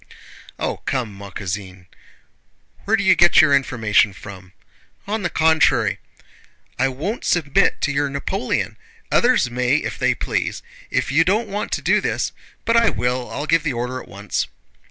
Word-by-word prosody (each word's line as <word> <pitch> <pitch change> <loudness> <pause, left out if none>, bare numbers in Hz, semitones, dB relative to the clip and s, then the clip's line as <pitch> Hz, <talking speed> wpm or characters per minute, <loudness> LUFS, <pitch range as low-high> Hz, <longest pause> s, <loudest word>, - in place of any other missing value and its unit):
"Oh, - - -2
come, 125 -6 -3
ma 100 0 -10
cousine! 95 -1 -6 1.0
Where 220 +2 +3
do 200 - -1
you 190 0 +6
get 175 -1 +5
your 145 -3 +6
information 110 -7 +2
from? 95 -2 -11 0.5
On 215 +2 -2
the 175 - -1
contrary..." 160 0 +2 0.8
"I 135 - +3
won't 155 - -4
submit 145 -6 +2
to 145 - +1
your 140 0 0
Napoleon! 140 +9 -2 0.3
Others 240 - +3
may 125 +2 +1
if 155 - -2
they - - +2
please.... - - -2 0.3
If - - -1
you 155 +4 +4
don't 210 +6 0
want 205 +1 -4
to - - -2
do - - +3
this..." - - -1 0.3
"But 230 0 +3
I 230 - +5
will, 125 0 -2
I'll 145 - -4
give 165 +1 +3
the 155 -3 -2
order 125 +2 -3
at - - -14
once." 100 +1 -3
140 Hz, 165 wpm, -21 LUFS, 115-175 Hz, 1.0 s, you